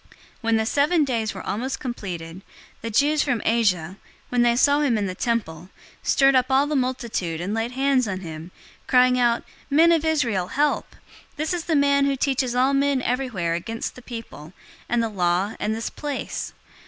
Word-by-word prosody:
021:027 - - -30 0.3
When 225 -1 +1
the 220 - 0
seven 295 +7 +2
days 230 -5 -1
were 190 - -7
almost 240 +7 -3
completed, 185 - -6 0.4
the 230 - -4
Jews 290 +7 +3
from 250 -5 0
Asia, 195 -6 +1 0.3
when 245 -1 +1
they 240 0 +4
saw 285 +4 +4
him 270 -7 +2
in 205 - -1
the 185 - -3
temple, 185 -6 -2 0.3
stirred 275 0 +4
up 255 -1 +3
all 270 +2 +4
the 300 +1 -2
multitude 235 - -2
and 185 +4 -3
laid 225 +2 -2
hands 265 -2 +2
on 190 -1 -4
him, 160 -1 -8 0.4
021:028 - - -35
crying 250 0 +4
out, 235 -1 +2 0.3
"Men 320 +4 +5
of 325 -2 +3
Israel, 240 - 0
help! 295 +8 0 0.4
This 310 +3 -2
is 345 -2 -3
the 325 - +1
man 280 -1 +3
who 275 - +1
teaches 260 -2 0
all 260 +2 +3
men 275 -2 +1
everywhere 240 -10 -1
against 225 +7 -4
the 250 - -13
people, 225 -10 -9 0.4
and 240 0 +1
the - - 0
law, 185 0 0
and 215 +1 -1
this 225 - -4
place. 290 -2 -5
240 Hz, 190 wpm, -23 LUFS, 205-275 Hz, 0.4 s, Men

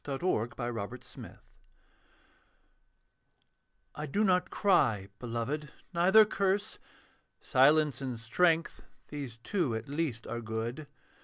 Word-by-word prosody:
THE 140 - -4
UNPARDONABLE 120 - -2
SIN - - -11 2.6
I 150 +1 -5
do 205 +10 +1
not 180 -3 +2
cry, 120 - +2
beloved, 125 +5 -3 0.2
neither 190 +6 +6
curse. 200 -1 -1 0.6
Silence 145 0 +3
and 125 -4 -4
strength, 165 +8 +1 0.3
these 140 -6 -6
two 140 - -1
at 110 0 -5
least 145 -5 -2
are 120 +1 -4
good. 115 +6 -4
140 Hz, 100 wpm, -31 LUFS, 115-170 Hz, 2.6 s, neither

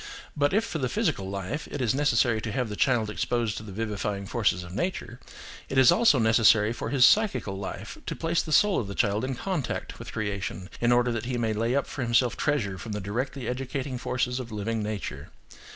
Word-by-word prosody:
But 145 -1 +2
if 220 +3 +2
for 160 - -4
the 130 -2 -1
physical 95 -4 -1
life 100 - -4
it - - -5
is 120 -4 +1
necessary 120 -5 +2
to 110 - -4
have 125 -2 -1
the 105 - -4
child 120 -2 +2
exposed 115 -1 -1
to - - -5
the 110 -2 -9
vivifying 105 -1 -3
forces 105 -5 0
of 85 0 -10
nature, 120 - -3 0.5
it 135 - -2
is 130 -2 +7
also 225 - +5
necessary 110 -1 +4
for - - -4
his 135 -3 +5
psychical 205 - +3
life 95 0 -6
to - - -2
place 170 +1 0
the 155 - -7
soul 205 +5 +4
of 110 - -3
the 100 - -6
child 105 0 +1
in 130 0 -2
contact 175 +1 -3
with - - -8
creation, 100 -3 -4
in 120 0 +2
order 120 0 +3
that 115 0 -3
he 125 0 -2
may 115 -2 0
lay 115 +4 0
up 140 - +1
for 140 - -6
himself 120 0 +2
treasure 105 -11 -1
from 110 - -6
the 105 - -2
directly 120 +6 -3
educating 130 +1 -3
forces 125 0 -1
of 120 -3 -7
living 110 +1 -2
nature. 105 -1 -5
120 Hz, 215 wpm, -27 LUFS, 105-130 Hz, 0.5 s, is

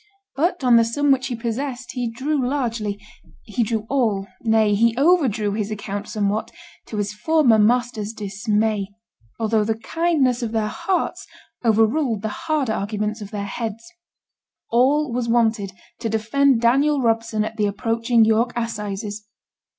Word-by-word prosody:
But 335 +2 0
on 245 -2 +6
the 230 - +5
sum 280 +5 +1
which 260 -1 +2
he 245 - -3
possessed 240 +1 -4
he 245 -2 -2
drew 265 +4 -1
largely 230 -6 -2 0.4
he 215 +2 -3
drew 220 -1 -1
all 225 -8 0 0.2
nay, 220 -2 +3
he 230 +3 +2
overdrew 265 - +3
his 210 0 -2
account 205 -1 -5
somewhat, 210 0 -1 0.4
to 215 - -6
his 205 0 -2
former 245 -1 +3
masters' 225 -1 +1
dismay, 210 0 -1 0.5
although 220 -1 +2
the 220 +1 -1
kindness 270 -1 +1
of 230 -2 -3
their 215 -1 0
hearts 370 - -2 0.4
overruled 225 +1 +2
the 220 - -1 0.2
harder 285 -8 +1
arguments 210 +1 -3
of 205 - -7
their 205 -1 -4
heads. 225 +2 -5 0.9
All 265 +3 +3
was 240 -1 -1
wanted 220 -4 +1 0.3
to 230 - -2
defend 230 +4 +2
Daniel 275 +5 +3
Robson 225 -3 0
at 220 - -7
the 210 -1 +2
approaching 230 +3 +2
York 225 +2 +2
assizes. 210 -2 -4
225 Hz, 150 wpm, -22 LUFS, 215-250 Hz, 0.9 s, on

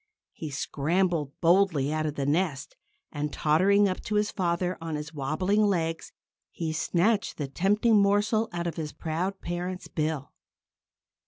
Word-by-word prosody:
He 155 - -6
scrambled 155 +2 -1
boldly 165 -5 +3
out 155 0 0
of 150 - -4
the 140 - -2
nest; 150 -2 -1 0.4
and 150 0 -3
tottering 195 +9 +3
up 185 - -3
to 210 - -2
his 210 +1 +1
father 180 -1 -1
on 165 -1 -3
his 150 +1 -6
wobbling 155 +9 0
legs, 165 -6 0 0.4
he 160 -2 -4
snatched 195 +6 +1
the 145 - -3
tempting 205 - +3
morsel 205 +3 +2
out 175 -1 -3
of 170 - -3
his 155 -2 -4
proud 180 +4 -3
parent's 180 +1 -4
bill. 155 -3 -2
170 Hz, 150 wpm, -27 LUFS, 155-195 Hz, 0.4 s, boldly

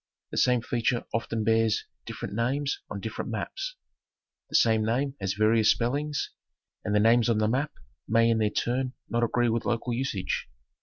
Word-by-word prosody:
The - - -5
same 125 -2 +3
feature 120 0 0
often 115 -1 -1
bears 110 0 +2 0.2
different - - -6
names 135 +6 0
on 100 - -5
different 110 +3 -4
maps. 390 - -4 0.7
The - - -4
same 110 -1 +4
name 130 +5 0
has 95 -1 0
various 110 +1 +4
spellings, 145 +5 0 0.5
and 105 -1 0
the - - +5
names 115 +2 +4
on 115 - +3
the 110 0 +2
map 135 +7 0 0.3
may 115 +1 +4
in 115 - +2
their 105 -1 +2
turn 125 +4 -1 0.2
not 120 0 +1
agree 120 +1 +2
with 115 0 0
local 120 +1 -1
usage. 115 -6 -2
115 Hz, 170 wpm, -27 LUFS, 110-125 Hz, 0.7 s, the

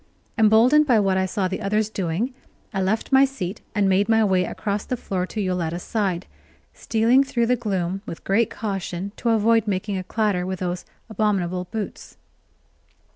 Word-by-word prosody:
Emboldened 235 +7 +5
by 240 -5 +5
what 195 -2 +2
I 190 0 +1
saw 190 0 -1
the 190 +3 -4
others 210 +1 +1
doing, 200 +4 -2 0.4
I 190 - -1
left 205 +7 -1
my 265 0 +7
seat 220 -8 -3
and 205 -2 +3
made 195 +3 +2
my 225 -1 +4
way 185 -3 +2
across 205 +1 -3
the 250 - -3
floor 185 -4 -3
to 215 - -6
Yoletta's 180 -3 -2
side, 195 -5 -1 0.5
stealing 235 +4 +3
through 240 -3 0
the 250 +2 +3
gloom 195 -5 -2
with 165 - -7
great 215 +3 +2
caution 195 -2 -4
to 235 - -1
avoid 225 0 +3
making 195 0 -1
a - - -5
clatter 205 -3 0
with 185 +1 -3
those 180 -1 -3 0.2
abominable 190 -5 -1
boots. 215 +2 -6
205 Hz, 175 wpm, -23 LUFS, 185-225 Hz, 0.5 s, my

